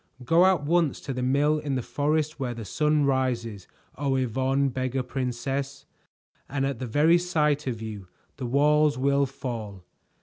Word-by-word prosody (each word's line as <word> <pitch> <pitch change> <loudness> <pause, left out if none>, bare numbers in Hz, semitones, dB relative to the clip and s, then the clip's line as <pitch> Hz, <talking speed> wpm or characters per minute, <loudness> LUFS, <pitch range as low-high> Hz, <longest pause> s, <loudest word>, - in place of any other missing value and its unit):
Go 170 +7 +5
at 185 -6 +2
once 165 0 +1
to 135 - -4
the 125 - -3
mill 145 +4 +2
in 145 -3 -3
the 130 - -2
forest 150 +2 -1
where 125 -3 -3
the 115 -2 -7
sun 150 - +1
rises, 120 -7 -1 0.3
O 140 -2 0
Yvonne, 130 +2 +1
Beggar 130 0 -2
Princess, 135 +2 -3 0.6
and 135 -1 -1
at 135 -4 -3
the 130 - -4
very 155 +8 +4
sight 150 -5 0
of 115 -3 -3
you 105 -4 -7 0.3
the 125 - -4
walls 150 +3 +3
will 140 +1 +2
fall. 115 -8 -6
135 Hz, 165 wpm, -26 LUFS, 125-150 Hz, 0.6 s, Go